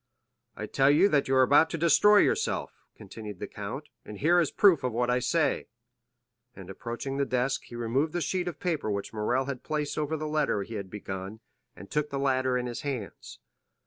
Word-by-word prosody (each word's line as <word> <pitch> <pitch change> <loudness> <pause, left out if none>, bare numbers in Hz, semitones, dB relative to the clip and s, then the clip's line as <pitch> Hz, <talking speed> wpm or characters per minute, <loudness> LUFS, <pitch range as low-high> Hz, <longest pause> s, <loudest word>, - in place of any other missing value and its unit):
"I - - -5
tell 135 0 +2
you 155 +7 +5
that 145 -5 +2
you 135 - +1
are 130 - +6
about 145 +5 +5
to 165 - -3
destroy 170 +6 +5
yourself," 440 0 0 0.2
continued 105 -3 -9
the 105 - -5
count, 105 +10 -7
"and 105 - -9
here 170 - +3
is 165 - +2
proof 180 -9 +4
of 125 - 0
what 120 +2 0
I 125 - +2
say;" 150 +6 0 0.9
and, 95 -1 -10
approaching 120 +6 -5
the 140 - +2
desk, 130 +1 -1
he 120 - -11
removed 125 +7 -1
the 175 - -1
sheet 180 +4 -1
of 170 -4 -5
paper 160 -10 -2
which 100 +1 -3
Morrel 120 +5 0
had 135 -2 -5
placed 150 -1 -3
over 155 +1 -1
the 155 - -4
letter 150 -9 0
he 115 - -10
had 100 -3 -5
begun, 95 +1 -7 0.4
and 100 - -12
took 150 0 0
the 140 - -4
latter 130 -2 +1
in 125 - -2
his 120 -1 -5
hands. 130 -8 -6
135 Hz, 210 wpm, -28 LUFS, 115-155 Hz, 0.9 s, are